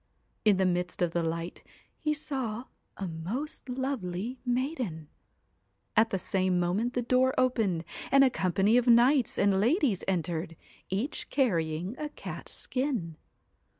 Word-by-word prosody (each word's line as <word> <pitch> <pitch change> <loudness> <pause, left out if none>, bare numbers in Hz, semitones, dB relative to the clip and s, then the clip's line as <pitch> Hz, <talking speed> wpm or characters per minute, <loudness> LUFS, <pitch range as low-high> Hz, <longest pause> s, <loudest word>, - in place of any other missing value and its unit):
In 210 -3 +5
the 190 - +2
midst 180 0 0
of 170 - +1
the 170 - 0
light 165 +1 -3 0.4
he 305 - 0
saw 260 -7 -2 0.3
a 195 - -3
most 205 - -5
lovely 250 -3 -3
maiden. 245 - -2 0.9
At 220 +1 +5
the 195 - 0
same 185 -1 +1
moment 195 +8 0
the 245 - 0
door 255 +2 +3
opened, 220 -10 +1 0.3
and 275 0 +7
a 265 - +4
company 195 +3 +2
of 250 0 +2
knights 240 +2 +5
and 195 -1 +3
ladies 240 - +2
entered, 170 -2 -1 0.3
each 215 +10 -2
carrying 175 - 0
a 300 -1 -3
cat's - - -8
skin. 250 - -2
215 Hz, 140 wpm, -29 LUFS, 180-255 Hz, 0.9 s, and